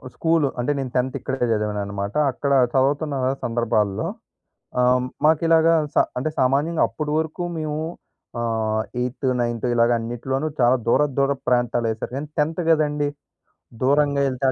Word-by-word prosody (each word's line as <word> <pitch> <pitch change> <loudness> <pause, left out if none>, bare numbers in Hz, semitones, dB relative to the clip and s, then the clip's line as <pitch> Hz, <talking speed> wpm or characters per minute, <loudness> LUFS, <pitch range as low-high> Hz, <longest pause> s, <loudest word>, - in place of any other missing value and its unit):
School. 165 -2 +2
అంటే 125 +4 0
నేను 130 -2 -4
10థ్ 125 +1 0
ఇక్కడే 130 -2 -2
చదివాననమాట. 100 -1 -3 0.2
అక్కడ 140 +2 -3 0.2
చవుతున్న 140 +2 +1 0.3
సందర్భాల్లో 110 -4 0 0.7
ఆహ్, 125 0 +3 0.2
మాకిలాగా 165 +1 +4 0.2
స - - -25 0.2
అంటే 155 +5 -1
సామాన్యంగా 145 +6 +2
అప్పడి 150 -1 -4
వరకు 160 +2 -3 0.2
మేము 155 -1 -3 0.6
ఆహ్, 110 -1 0 0.2
ఎయిత్, 125 +2 -3
నైన్త్ 120 0 -1
ఇలాగ 115 0 +3
అన్నిటిలోనూ 125 +5 -3
చాలా 125 +1 +4
దూరపు 140 +3 +2
దూరపు 135 -1 +1
ప్రాంతాలెసారు. 120 -2 0
ఎన్ 150 - -5
10థ్ 160 +4 0
గదండీ! 150 -2 +2 0.7
దూరంగా 140 +1 +3
ఎళ్తే, 130 +1 -1
130 Hz, 130 wpm, -22 LUFS, 120-150 Hz, 0.7 s, మాకిలాగా